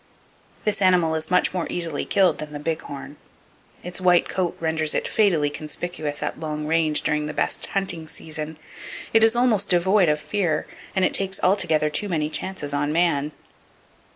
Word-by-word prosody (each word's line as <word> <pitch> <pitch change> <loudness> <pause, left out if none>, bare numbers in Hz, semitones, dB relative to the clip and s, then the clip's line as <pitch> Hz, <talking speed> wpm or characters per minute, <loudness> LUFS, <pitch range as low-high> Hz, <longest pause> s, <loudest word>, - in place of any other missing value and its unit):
This 210 -1 0
animal 180 -4 +4
is 160 0 -1
much 180 - +2
more 180 -3 -2
easily 170 -2 -2
killed 190 -6 +2
than 150 -1 -6
the 145 - -5
big 160 +1 -2
horn. 140 +1 -9 0.7
Its 180 +1 -4
white 180 -1 +4
coat 180 -2 -2
renders 160 -1 +1
it - - 0
fatally 170 -9 +2
conspicuous 155 0 -3
at - - -3
long 150 -1 -4
range 155 -1 +1
during 150 0 0
the 150 - -6
best - - -1
hunting 175 -5 -2
season; 155 0 -3 0.6
it 225 0 +5
is 225 +1 +5
almost 235 -5 +2
devoid 185 0 +4
of 150 0 +1
fear, 175 -4 -1 0.3
and 190 -1 +3
it - - 0
takes 190 -1 +1
altogether 160 -5 +2
too 205 +7 -1
many 155 -3 -1
chances 150 -2 -4
on 145 +1 0
man. 155 -3 +1
165 Hz, 175 wpm, -23 LUFS, 150-185 Hz, 0.7 s, it